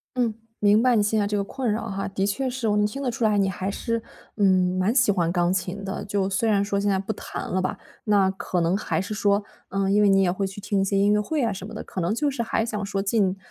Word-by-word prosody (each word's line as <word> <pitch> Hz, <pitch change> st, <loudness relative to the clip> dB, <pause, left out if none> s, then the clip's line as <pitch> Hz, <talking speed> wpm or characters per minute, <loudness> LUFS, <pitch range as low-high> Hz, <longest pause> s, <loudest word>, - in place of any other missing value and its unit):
嗯， 235 Hz, -3 st, +1 dB, 0.3 s
明 210 Hz, +2 st, +4 dB
白 250 Hz, -1 st, +4 dB
你 210 Hz, -, +3 dB
现 215 Hz, +1 st, +1 dB
在 205 Hz, -, +1 dB
这 205 Hz, 0 st, -1 dB
个 200 Hz, -, 0 dB
困 245 Hz, +2 st, -2 dB
扰 225 Hz, +1 st, -2 dB
哈。 195 Hz, 0 st, -3 dB
的 195 Hz, 0 st, -1 dB
确 255 Hz, +6 st, -1 dB
是， 245 Hz, -2 st, -3 dB
我 210 Hz, -, +2 dB
能 210 Hz, -, +3 dB
听 240 Hz, +7 st, -4 dB
得 255 Hz, -3 st, -1 dB
出 245 Hz, 0 st, -4 dB
来 215 Hz, -2 st, +3 dB
你 195 Hz, -, +3 dB
还 190 Hz, +1 st, -3 dB
是， 230 Hz, +3 st, -2 dB, 0.4 s
嗯， 185 Hz, -2 st, +3 dB
蛮 195 Hz, +5 st, +2 dB
喜 235 Hz, -6 st, +4 dB
欢 170 Hz, -3 st, +1 dB
钢 175 Hz, 0 st, +1 dB
琴 190 Hz, +1 st, -3 dB
的。 195 Hz, +1 st, -4 dB
就 200 Hz, -1 st, 0 dB
虽 195 Hz, +4 st, +1 dB
然 200 Hz, -1 st, +3 dB
说 200 Hz, -1 st, -1 dB
现 205 Hz, 0 st, +1 dB
在 195 Hz, -, +2 dB
不 195 Hz, +3 st, -3 dB
弹 -, -, -6 dB
了 185 Hz, 0 st, 0 dB
吧， 185 Hz, -, -2 dB, 0.3 s
那 200 Hz, -3 st, +4 dB
可 185 Hz, -1 st, -3 dB
能 170 Hz, +3 st, +2 dB
还 205 Hz, -, -1 dB
是 200 Hz, +3 st, -4 dB
说， 205 Hz, 0 st, +2 dB, 0.3 s
嗯， 195 Hz, 0 st, 0 dB
因 205 Hz, +1 st, +4 dB
为 205 Hz, -, +5 dB
你 195 Hz, 0 st, +5 dB
也 175 Hz, -, +2 dB
会 195 Hz, +1 st, -1 dB
去 195 Hz, +1 st, -9 dB
听 200 Hz, -1 st, 0 dB
一 -, -, +2 dB
些 195 Hz, 0 st, 0 dB
音 200 Hz, +1 st, +4 dB
乐 210 Hz, -, +3 dB
会 290 Hz, +4 st, -1 dB
啊 225 Hz, -3 st, +1 dB
什 190 Hz, +1 st, -7 dB
么 220 Hz, -, -10 dB
的， 215 Hz, -, -6 dB
可 185 Hz, -, -5 dB
能 170 Hz, +5 st, 0 dB
就 290 Hz, +6 st, 0 dB
是 255 Hz, -, -3 dB
还 225 Hz, -1 st, 0 dB
想 210 Hz, -3 st, -3 dB
说， 195 Hz, 0 st, -2 dB
尽 195 Hz, -2 st, +1 dB
200 Hz, 315 characters per minute, -24 LUFS, 195-220 Hz, 0.4 s, 为